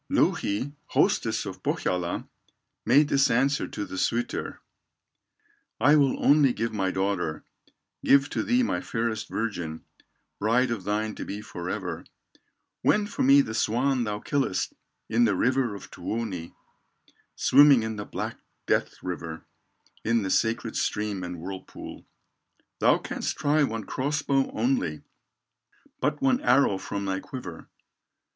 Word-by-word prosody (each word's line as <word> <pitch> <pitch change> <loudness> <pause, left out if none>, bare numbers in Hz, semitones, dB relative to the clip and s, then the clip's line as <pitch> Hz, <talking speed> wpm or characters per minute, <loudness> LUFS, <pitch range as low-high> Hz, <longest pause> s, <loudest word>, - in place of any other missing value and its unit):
Louhi, 115 +8 +1
hostess - - +1
of - - -7
Pohyola, 90 -1 -1 0.6
Made 145 +5 +5
this 135 0 +4
answer 135 +5 +2
to 105 - -5
the 95 - -6
suitor: 120 +1 -1 1.2
"I 145 - +6
will 140 -3 +2
only 140 -3 +5
give 115 +1 -2
my 95 -3 0
daughter, 95 -4 -1 0.6
Give 140 0 +5
to - - 0
thee 250 +1 +2
my - - -1
fairest 115 -2 -2
virgin, 85 -8 -4 0.5
Bride 120 +4 +2
of 105 -6 -3
thine 105 +1 -1
to - - -6
be 100 - -5
forever, 90 -3 -5 0.8
When 210 0 +3
for 205 - -5
me 140 +2 +7
the 110 - -4
swan 125 +4 +1
thou 105 -2 -2
killest 135 -6 -1 0.3
In 115 +2 +3
the 105 -3 +2
river 125 +1 +1
of 100 - -11
Tuoni, 100 -7 -4 0.8
Swimming 140 -3 +6
in 110 -1 -4
the 105 - -4
black - - -5 0.3
death - - +1
river, 80 -3 -5 0.6
In 115 -1 +2
the 95 - -2
sacred 115 0 0
stream 105 -3 -1
and 90 0 -5
whirlpool; 95 +3 -8 0.7
Thou - - +5
canst - - -4
try 150 +2 +2
one 115 -6 0
cross 145 +7 -2
bow 135 -1 +1
only, 255 +1 -1 1.0
But - - -1
one 260 -1 +3
arrow 140 - +3
from 100 +1 -4
thy 95 -1 -1
quiver." 95 -8 -8
115 Hz, 140 wpm, -27 LUFS, 100-135 Hz, 1.2 s, me